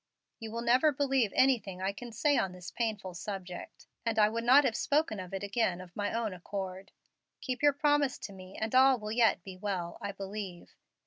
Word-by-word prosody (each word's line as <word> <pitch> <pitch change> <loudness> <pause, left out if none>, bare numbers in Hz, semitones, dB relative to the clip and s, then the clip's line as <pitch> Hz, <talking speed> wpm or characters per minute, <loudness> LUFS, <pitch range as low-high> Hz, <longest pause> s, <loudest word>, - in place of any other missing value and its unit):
You 225 - -6
will 230 +1 -4
never 255 +6 +4
believe 270 -6 +1
anything 230 -8 +2
I 190 +1 0
can 235 +4 -9
say 290 +6 +2
on 195 -8 0
this 180 -1 -9
painful 215 -6 -3
subject, 180 0 -7 0.2
and 230 -2 -1
I 210 -1 +6
would 230 +1 -3
not 260 +4 +7
have 255 -5 +1
spoken 275 -4 +1
of 185 -1 -7
it 195 0 -4
again 200 -3 0
of 180 -1 -12
my 205 0 -1
own 225 -3 -1
accord. 190 +1 -6 0.5
Keep 255 -2 -4
your 290 -1 +5
promise 290 -1 +2
to 200 - -8
me, 185 0 -11
and 220 +2 -2
all 260 0 +6
will 210 -1 -6
yet 225 -5 +3
be 190 -2 -8
well, 185 -3 -3
I 200 - -3
believe. 195 -2 -7
215 Hz, 205 wpm, -31 LUFS, 190-255 Hz, 0.5 s, not